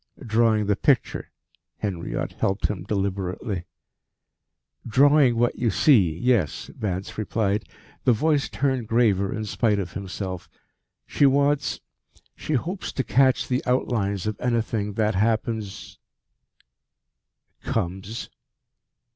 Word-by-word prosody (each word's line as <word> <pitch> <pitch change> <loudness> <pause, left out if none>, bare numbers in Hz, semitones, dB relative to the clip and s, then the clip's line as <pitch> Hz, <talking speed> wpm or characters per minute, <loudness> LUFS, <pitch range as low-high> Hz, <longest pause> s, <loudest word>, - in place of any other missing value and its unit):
"Drawing 110 -1 +2
the 100 0 +2
picture," 135 +3 +1 0.5
Henriot 90 -5 -3
helped 95 +1 -1
him 105 -4 -4
deliberately. 95 -2 -2 1.2
"Drawing 135 +1 +5
what 120 +1 +1
you 120 - +2
see, 95 - +4
yes," 115 - 0
Vance 95 0 -4
replied, 105 -1 -1 0.3
the - - +4
voice 145 +4 +1
turned 130 -5 -1
graver 105 -4 +2
in 110 0 -3
spite 105 0 +1
of 90 -3 -4
himself. 95 -2 -5 0.6
"She 145 - +3
wants 140 +1 +1 0.5
she 155 - -4
hopes 175 - -2
to 130 - -1
catch 130 0 +3
the 125 0 0
outlines 105 -6 0
of 110 -1 -3
anything 115 -4 -1
that 110 0 +1
happens 110 0 -2 0.8
" - - -49
"Comes." 95 +6 -3
110 Hz, 115 wpm, -24 LUFS, 100-125 Hz, 1.2 s, Drawing